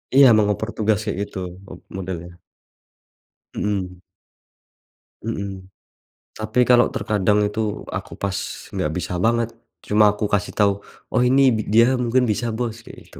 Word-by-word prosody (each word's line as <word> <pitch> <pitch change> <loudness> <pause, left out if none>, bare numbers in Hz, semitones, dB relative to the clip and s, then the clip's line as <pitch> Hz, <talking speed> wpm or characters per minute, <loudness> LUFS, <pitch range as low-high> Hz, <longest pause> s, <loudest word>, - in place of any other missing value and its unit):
Iya, 135 0 +9
mau 110 - +4
ngoper 105 +2 -1
tugasnya 110 0 +1
gitu, 100 - -5 0.3
ob 90 - -10 0.2
modelnya. 90 -2 -6 1.2
Mhm. 95 -3 -2 1.2
Mhm. 100 -4 -5 0.7
Tapi, 110 +3 -1
kalau, 120 0 +5
terkadang 105 0 +1
itu 105 0 -2
aku - - -5
pas 100 -2 -3 0.3
nggak 75 - -1
bisa 90 0 -3
banget, 115 +3 +2 0.3
cuma 105 0 +4
aku 105 +1 -2
kasih 105 0 0
tahu, 105 -1 +4 0.4
"Oh - - +2
ini, 135 +2 +5
bi 110 - -1
dia 115 +4 +4
mungkin 125 +1 +2
bisa 115 +3 0
Bos." 115 0 -3
kayak - - -13
gitu. - - -12
105 Hz, 140 wpm, -22 LUFS, 100-115 Hz, 1.2 s, Iya